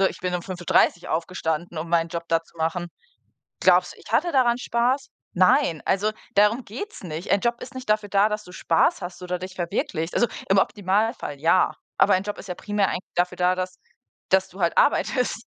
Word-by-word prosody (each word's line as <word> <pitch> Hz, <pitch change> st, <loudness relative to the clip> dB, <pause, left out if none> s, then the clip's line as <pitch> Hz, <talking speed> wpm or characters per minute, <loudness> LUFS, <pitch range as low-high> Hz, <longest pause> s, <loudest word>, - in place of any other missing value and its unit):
so, 195 Hz, -, +5 dB
ich -, -, -10 dB
bin 180 Hz, 0 st, -2 dB
um 175 Hz, -, -2 dB
5:30 175 Hz, -1 st, +1 dB
aufgestanden, 165 Hz, 0 st, -2 dB
um 165 Hz, -, -4 dB
meinen 165 Hz, -1 st, +2 dB
Job 170 Hz, -1 st, -5 dB
da 165 Hz, 0 st, +2 dB
zu 170 Hz, -, -25 dB
machen. 165 Hz, +2 st, -1 dB, 0.7 s
Glaubst -, -, +4 dB
du, -, -, -19 dB
ich -, -, -13 dB
hatte 345 Hz, -, +2 dB
daran 245 Hz, -3 st, +3 dB
Spaß? 250 Hz, +3 st, 0 dB, 0.3 s
Nein, 175 Hz, -3 st, +3 dB
also 205 Hz, +3 st, +1 dB, 0.2 s
darum 210 Hz, +5 st, +4 dB
geht's 255 Hz, -, -7 dB
nicht. 165 Hz, +1 st, -5 dB
Ein 200 Hz, -, +4 dB
Job 235 Hz, 0 st, 0 dB
ist -, -, -9 dB
nicht 255 Hz, -4 st, -8 dB
dafür 210 Hz, -1 st, +1 dB
da, 200 Hz, +2 st, +3 dB
dass 210 Hz, 0 st, -3 dB
du 180 Hz, -, -13 dB
Spaß 170 Hz, 0 st, +1 dB
hast 175 Hz, 0 st, -7 dB
oder 180 Hz, 0 st, -3 dB
dich 185 Hz, 0 st, -8 dB
verwirklichst. 170 Hz, -1 st, -2 dB
Also, 240 Hz, -, +3 dB, 0.2 s
im 195 Hz, -, +4 dB
Optimalfall 205 Hz, -, 0 dB
ja, 165 Hz, +4 st, +3 dB, 0.3 s
aber 200 Hz, -, +5 dB
ein 185 Hz, +1 st, +2 dB
Job 205 Hz, 0 st, -5 dB
ist -, -, -10 dB
ja 180 Hz, -, -4 dB
primär 205 Hz, -2 st, 0 dB
eigentlich -, -, -3 dB
dafür 180 Hz, +1 st, 0 dB
da, 180 Hz, 0 st, +2 dB
dass 185 Hz, 0 st, -4 dB, 0.5 s
dass 190 Hz, 0 st, +3 dB
du 190 Hz, 0 st, -11 dB
halt 170 Hz, -, +1 dB
arbeitest. 250 Hz, -5 st, +1 dB
185 Hz, 210 wpm, -24 LUFS, 175-210 Hz, 0.7 s, so